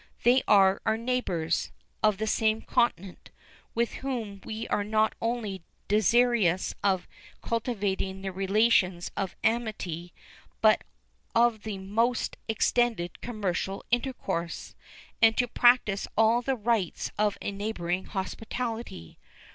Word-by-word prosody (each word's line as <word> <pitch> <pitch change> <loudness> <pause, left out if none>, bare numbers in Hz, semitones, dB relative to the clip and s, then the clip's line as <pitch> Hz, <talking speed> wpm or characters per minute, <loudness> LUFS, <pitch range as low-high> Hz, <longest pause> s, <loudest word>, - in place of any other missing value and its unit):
They 250 +2 +5
are 195 -1 +5
our 220 - +1
neighbors, 205 -10 -1 0.3
of 215 -2 +3
the 220 - -2
same 220 0 +1
continent, 195 -6 -1 0.5
with 235 0 0
whom 230 -7 -4
we 220 +1 -5
are 205 - +1
not 215 +1 +2
only 230 -5 -2 0.3
desirous 215 -3 +3
of 190 -3 +1 0.4
cultivating 200 -5 -2
the 195 - -3
relations 195 -2 +2
of 195 -2 -3
amity, 205 -7 -1 0.5
but - - +4 0.5
of 230 -2 +3
the 210 -1 -5
most 225 +6 0
extended 220 -5 0
commercial 195 -4 -3
intercourse, 215 -9 -2 0.5
and 225 -1 +6
to 245 - +2
practice 240 -5 +3
all 225 +2 +4
the 265 +2 0
rites 220 -5 -1
of 210 -1 +2
a - - -3
neighborhood 190 -3 -3
hospitality. 225 - -5
215 Hz, 115 wpm, -28 LUFS, 190-235 Hz, 0.5 s, and